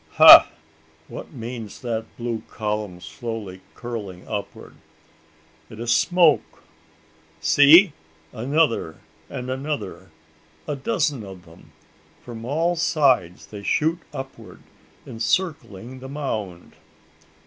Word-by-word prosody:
Ha! - - +10 0.6
what - - -9
means 115 -5 -8
that 115 -3 -3
blue 120 -2 -3
column 105 -4 -4
slowly 110 -6 -7
curling 105 -7 -7
upward? 105 -2 -7 0.9
It 110 - -12
is 115 0 +1
smoke! 175 -4 +2 0.8
See! 155 +5 +6 0.4
Another 120 - 0 0.3
and 125 +1 -5
another 130 -9 -5 0.6
a 150 - -2
dozen 140 -2 -1
of 95 -2 -11
them! 80 0 -18 0.5
From 115 -2 -9
all 165 +7 0
sides 130 - +1
they 105 -2 -10
shoot 160 +10 0
upward, 135 -2 -9 0.4
encircling 125 - -3
the 130 +1 -9
mound! 110 -11 -5
120 Hz, 100 wpm, -23 LUFS, 105-145 Hz, 0.9 s, Ha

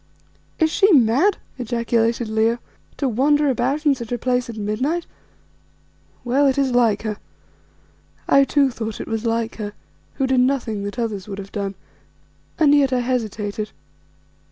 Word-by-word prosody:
"Is 320 -1 +2
she 400 +5 +4
mad," 275 - +4 0.2
ejaculated 235 -1 0
Leo, 220 +2 +1 0.4
"to 280 - 0
wander 285 +4 +2
about 265 +5 -1
in 290 - +5
such 235 -4 -7
a 245 - 0
place 250 0 -1
at 230 - -7
midnight? 255 +12 -1 1.2
Well, 270 +4 +2
it 270 - +1
is 275 -2 +2
like 230 -4 +2
her." 215 -2 -3 1.1
I 275 - +6
too 275 -1 +2
thought 220 -2 -5
it - - -6
was 225 +1 -2
like 230 0 -1
her, 205 -2 -5 0.4
who 270 - 0
did 260 -1 +2
nothing 245 -6 0
that 205 +4 -6
others 215 -5 -3
would 195 -2 -6
have 200 0 -8
done, 200 -2 -3 0.8
and 295 -3 +5
yet 280 -2 +4
I 250 -1 +1
hesitated. 215 -4 -2
240 Hz, 155 wpm, -21 LUFS, 220-275 Hz, 1.2 s, I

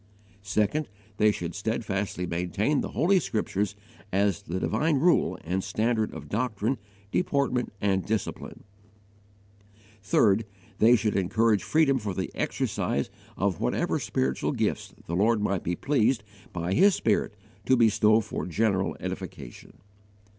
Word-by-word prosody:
2. 105 +2 +2 0.5
They 105 +1 +5
should 85 -4 -5
steadfastly 105 -4 -2
maintain 90 - 0
the - - -3
Holy 190 +3 +3
Scriptures 105 - -2 0.4
as 100 +1 +1
the 95 -1 -4
divine 150 +10 +1
rule 170 +4 +3
and 95 +3 -2
standard 110 +2 0
of - - -9
doctrine, 115 +2 -1 0.3
deportment, 140 -7 0
and 95 -2 +1
discipline. 110 -1 -4 1.4
3. 100 +1 +3 0.4
They 115 +3 +7
should 110 -2 0
encourage 105 +3 +2
freedom 145 -4 +2
for 105 -4 -4
the 95 - -3
exercise - - -1 0.3
of 95 -4 0
whatever - - 0
spiritual 65 0 -1
gifts - - -1
the 85 - -3
Lord 110 +4 +3
might 100 -3 0
be 90 - -2
pleased 125 - +1 0.3
by 85 +1 -2
His 195 - +5
Spirit 105 -1 0 0.3
to 130 - +5
bestow 110 -1 +4
for 105 - -5
general 95 +1 0
edification. - - -7
105 Hz, 130 wpm, -27 LUFS, 95-115 Hz, 1.4 s, They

